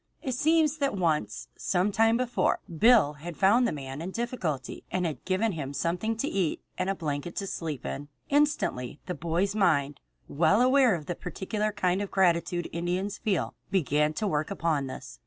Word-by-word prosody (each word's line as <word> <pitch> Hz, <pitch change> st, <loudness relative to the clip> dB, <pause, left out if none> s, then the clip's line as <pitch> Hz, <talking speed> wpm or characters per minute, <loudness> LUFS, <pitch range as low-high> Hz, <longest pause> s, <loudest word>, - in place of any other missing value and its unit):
It 260 Hz, -, -2 dB
seems 315 Hz, +3 st, +2 dB
that 275 Hz, -7 st, 0 dB
once, 165 Hz, -4 st, 0 dB
some 185 Hz, +2 st, 0 dB
time 225 Hz, +2 st, +3 dB
before, 250 Hz, -1 st, +1 dB, 0.2 s
Bill 215 Hz, -5 st, +5 dB
had 170 Hz, 0 st, -7 dB
found 230 Hz, +6 st, +4 dB
the -, -, -1 dB
man 135 Hz, 0 st, -6 dB
in 175 Hz, -, -4 dB
difficulty 190 Hz, -, -3 dB
and 180 Hz, -1 st, -1 dB
had 160 Hz, -3 st, -4 dB
given 195 Hz, +4 st, +1 dB
him 145 Hz, -5 st, -5 dB
something 180 Hz, +9 st, -1 dB
to 275 Hz, -, -1 dB
eat 185 Hz, -, 0 dB, 0.2 s
and 185 Hz, -, -1 dB
a 195 Hz, -, 0 dB
blanket 155 Hz, 0 st, -4 dB
to 200 Hz, -, -2 dB
sleep 160 Hz, -7 st, -4 dB
in. 145 Hz, +1 st, -4 dB, 0.2 s
Instantly 285 Hz, -, +1 dB
the 180 Hz, -, -3 dB
boy's 170 Hz, +4 st, -1 dB
mind, 145 Hz, -9 st, +2 dB, 0.3 s
well 165 Hz, +7 st, +3 dB
aware 255 Hz, -4 st, +5 dB
of 155 Hz, -3 st, -7 dB
the 175 Hz, -, -2 dB
peculiar 210 Hz, +5 st, -3 dB
kind 190 Hz, -2 st, 0 dB
of 200 Hz, -, -3 dB
gratitude 175 Hz, -2 st, +1 dB
Indians 180 Hz, +4 st, -2 dB
feel, 200 Hz, -6 st, -1 dB, 0.2 s
began 150 Hz, -5 st, +2 dB
to 210 Hz, -, -2 dB
work 155 Hz, -4 st, -1 dB
upon 165 Hz, -7 st, 0 dB
this. 60 Hz, -, -9 dB
185 Hz, 180 wpm, -28 LUFS, 155-215 Hz, 0.3 s, Bill